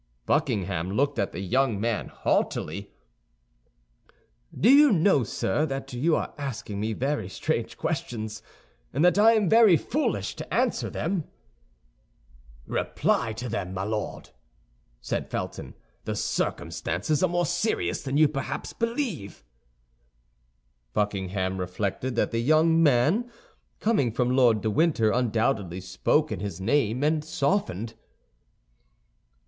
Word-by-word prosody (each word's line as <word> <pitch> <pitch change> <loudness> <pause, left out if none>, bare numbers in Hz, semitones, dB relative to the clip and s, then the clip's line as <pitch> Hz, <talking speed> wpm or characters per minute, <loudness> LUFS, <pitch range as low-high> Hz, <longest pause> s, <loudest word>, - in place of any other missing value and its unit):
Buckingham 90 -3 0
looked 135 +1 +1
at 100 - 0
the 85 - -6
young 120 +2 +1
man 115 0 -1
haughtily. - - -1 1.6
"Do 210 - +1
you 285 +2 +7
know, 170 - +4
sir, 105 +4 -1
that 135 -1 -5
you 155 +7 +2
are - - -3
asking 110 -7 -5
me 110 +2 -1
very 130 -4 -2
strange - - -2
questions, 110 -1 -3 0.5
and 150 +6 +2
that 180 +3 +4
I 225 +2 +7
am 215 -4 +2
very 220 -4 +6
foolish 295 - -2
to - - -8
answer - - 0
them?" 180 -6 -2 1.4
"Reply 110 - 0
to 120 +3 -5
them, 95 -5 -4
my 95 - -2
Lord," 105 +1 -4 0.7
said - - -3
Felton; - - -5 0.3
"the - - -2
circumstances 100 - -1
are 185 - +3
more 175 0 +1
serious 175 +7 -1
than 140 0 -2
you 155 0 +6
perhaps 140 -2 -4
believe." 230 - -3 1.5
Buckingham 95 -2 -1
reflected 100 +7 -3
that - - +1
the 115 - 0
young 160 +5 +4
man, 155 - +3 0.5
coming 205 - +2
from 125 +2 0
Lord 120 -5 +4
de 110 - 0
Winter, 145 -6 +2
undoubtedly 110 -6 0
spoke 95 +12 0
in - - -3
his 100 -4 -5
name, 120 +3 +1
and 155 0 +1
softened. 140 - -1
125 Hz, 125 wpm, -26 LUFS, 105-160 Hz, 1.6 s, you